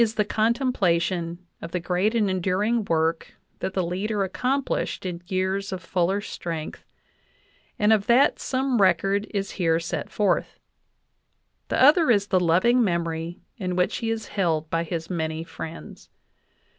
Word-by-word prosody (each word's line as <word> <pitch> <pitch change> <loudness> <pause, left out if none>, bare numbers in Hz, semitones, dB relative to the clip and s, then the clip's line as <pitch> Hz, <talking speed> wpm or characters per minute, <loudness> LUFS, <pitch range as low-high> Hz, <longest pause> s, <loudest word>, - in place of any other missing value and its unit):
the 210 - +1
contemplation 185 -7 0 0.2
of 165 - -6
the 180 - -1
great 180 +6 0
and 215 -3 +2
enduring 195 +5 0
work 165 -1 0 0.2
that 190 - -4
the 185 - +1
leader 200 +4 -1
accomplished 255 +4 -1
in 175 -2 -4
years 190 +2 -1
of 190 - -3
fuller 185 +3 0
strength, 165 -6 -6 0.9
and 210 +1 +4
of 205 -2 +1
that 250 +4 +4
some 260 -3 0
record 195 +3 +2
is 200 -2 -3
here 165 -1 +3
set 165 - -4
forth; 200 -4 0 1.1
the - - -1
other 300 +3 +6
is 205 -4 +4
the 185 - +3
loving 185 +9 +3
memory 170 -2 -2
in 180 -4 -3
which 180 0 +1
he 225 - -2
is 225 -1 -3
held 165 -5 0
by 165 0 +1
his 165 -1 -4
many 160 -2 -3
friends. 165 0 -9
185 Hz, 145 wpm, -25 LUFS, 170-215 Hz, 1.1 s, other